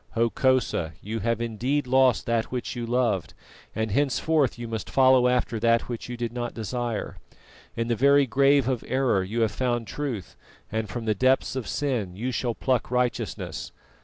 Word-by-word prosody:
_Hokosa, 115 - +1
you 110 +3 -4
have 115 +1 0
indeed 120 +5 -1
lost 130 -3 +3
that 115 -1 +1
which 125 0 -3
you 120 -1 -4
loved, 115 -7 0 0.4
and 110 -1 -1
henceforth 145 +3 +1
you 120 0 -6
must 110 -1 -5
follow 130 -1 +5
after 125 -2 0
that 115 +1 +2
which 120 0 -6
you 120 - -5
did 120 -1 -3
not 120 -1 -4
desire. 115 0 -3 0.6
In 115 0 -1
the 120 - +1
very 140 +3 +5
grave 135 +1 +3
of 130 -3 -1
error 130 -6 +2
you 110 +5 -2
have 110 -2 +2
found 120 0 -1
truth, 120 -5 -5 0.4
and 110 -1 -2
from 115 +4 -5
the 110 - +2
depths 130 +5 +2
of 130 -4 -3
sin 120 -11 -2
you 120 +6 -3
shall 120 -1 -2
pluck 130 -3 0
righteousness. 125 0 -2
120 Hz, 175 wpm, -26 LUFS, 115-130 Hz, 0.6 s, follow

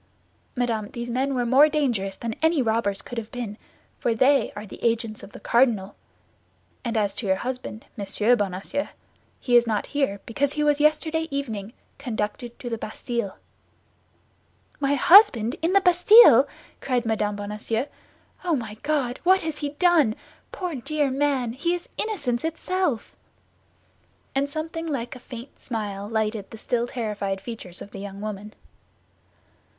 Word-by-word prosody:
"Madame, 230 -4 -1
those 240 0 -5
men 265 +3 0
were 245 -1 0
more 270 +5 +6
dangerous 240 -11 0
than 230 +1 -4
any 320 -1 +3
robbers 220 -4 0
could 245 - -5
have 220 -1 -9
been, 235 -4 -5 0.4
for 230 - +1
they 265 +1 +3
are 205 +1 -6
the 200 - -12
agents 230 -2 0
of - - -11
the - - -11
cardinal; 220 -4 +2 0.9
and 235 -2 -2
as 205 -2 +1
to 205 +1 -4
your 190 - +3
husband, 250 0 -5
Monsieur 210 +3 +2
Bonacieux, 200 +7 -2 0.5
he 245 - +1
is 240 0 +6
not 215 -2 0
here 270 -9 0
because 280 +5 -1
he 300 - 0
was 295 -1 +3
yesterday 315 +1 +2
evening 225 -8 -4 0.3
conducted 240 -1 -4
to 260 - -8
the 230 -2 -3
Bastille." 225 -2 -4 1.4
"My 285 0 +2
husband 345 - +6
in 335 +3 +1
the 395 - +6
Bastille!" 370 +6 +7 0.3
cried 250 -3 -1
Mme. 215 -2 0
Bonacieux. 210 +4 -3 0.6
"Oh, 345 -3 +2
my 220 -5 -5
God! 285 -5 -1
What 375 +1 +4
has 315 -2 -4
he 290 - -2
done? 300 -6 +3 0.4
Poor 360 -3 -4
dear 285 +1 -1
man, 265 -4 0
he 340 +7 0
is 350 - -8
innocence 285 - -1
itself!" 330 - -2 1.2
And 275 +1 0
something 325 +2 -4
like 250 -6 -3
a - - -10
faint 245 +1 -10
smile 205 -3 -4
lighted 220 -2 -1
the 225 - -10
still 240 +2 -1
terrified 210 -5 -3
features 195 -5 -6
of 200 - -13
the 195 - -8
young 195 0 -7
woman. 210 0 -6
240 Hz, 155 wpm, -25 LUFS, 215-290 Hz, 1.4 s, Bastille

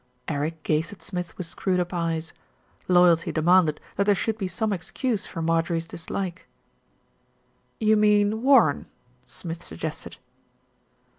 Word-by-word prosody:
Eric 155 +1 -3
gazed 155 +2 0
at 205 - -13
Smith 180 -2 -5
with 185 - -4
screwed 180 +2 -1
up 180 +1 -2
eyes. 165 -2 -2 0.5
Loyalty 175 -2 +4
demanded 165 -1 +3 0.2
that 200 - +2
there 205 0 +4
should 220 +2 -1
be 200 -3 -3
some 205 +4 -1
excuse 205 +5 -2
for 165 - -5
Mar 165 0 +3
jorie's 165 0 -3
dislike. 175 +2 -5 1.3
"You 215 0 +4
mean 210 0 +3
Warren," 270 +2 +4 0.4
Smith 165 -1 -7
suggested. 80 - -7
180 Hz, 135 wpm, -25 LUFS, 165-205 Hz, 1.3 s, Loyalty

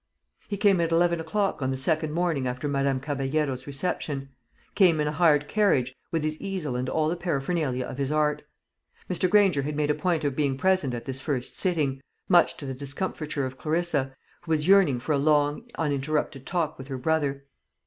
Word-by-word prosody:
He 205 - -3
came 195 -3 +4
at 165 0 0
eleven 170 0 +3
o'clock 195 +2 -1
on 130 - 0
the 130 - -1
second 155 +3 +1
morning 165 -5 0
after 125 +3 -3
Madame 140 -1 0
Caballero's 135 -1 -2
reception; 140 -2 -3 0.4
came 175 -6 +4
in 150 - +1
a - - 0
hired 150 -3 +3
carriage, 140 - +2 0.2
with 165 -2 -1
his 155 0 -2
easel 180 -10 -3
and 125 +1 -2
all 155 -1 +1
the 165 - 0
paraphernalia 150 -5 -1
of 130 - -7
his 140 0 -1
art. 150 -1 +1 0.7
Mr. 185 0 0
Granger 195 -7 +4
had 145 +2 -3
made 150 0 +1
a - - +2
point 160 +1 0
of 140 -2 -1
being 140 -3 0
present 185 -6 +1
at 120 - -7
this 135 0 -4
first 130 -4 -3
sitting, 150 -7 0 0.3
much 175 -2 +4
to 145 - -8
the 135 - -4
discomfiture 140 +1 -3
of 130 0 -7
Clarissa, 155 -4 -1 0.3
who - - -14
was 155 0 +1
yearning 190 -10 +5
for 125 - -4
a 145 - +2
long 145 - +2
uninterrupted 145 -2 -1
talk 165 -5 -1
with 130 - -8
her 135 -2 -4
brother. 140 0 -1
150 Hz, 195 wpm, -26 LUFS, 135-170 Hz, 0.7 s, yearning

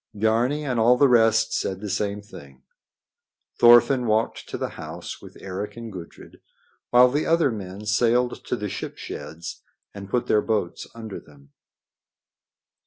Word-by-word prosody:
Biarni 115 +8 +1
and 125 -4 -1
all 120 +3 +5
the 140 - +5
rest 115 -2 +3
said 95 -1 -2
the 105 - -6
same 100 +1 -2
thing. 70 - -14 1.0
Thorfinn 120 +1 +6
walked 110 +1 0
to - - -4
the - - -3
house - - -8
with - - -13
Eric 100 +4 -6
and 115 -2 -8
Gudrid, 85 -3 -11 0.5
while 125 +1 +7
the 145 +3 0
other 165 -4 +3
men 100 -1 -7
sailed 120 +3 +1
to - - -1
the - - -4
ship - - -6
sheds 80 +1 -8 0.3
and 100 -1 -9
pulled 125 +3 -1
their 105 - +3
boats 105 -6 -2
under 110 -3 -7
them. 70 -2 -20
110 Hz, 155 wpm, -24 LUFS, 100-120 Hz, 1.0 s, while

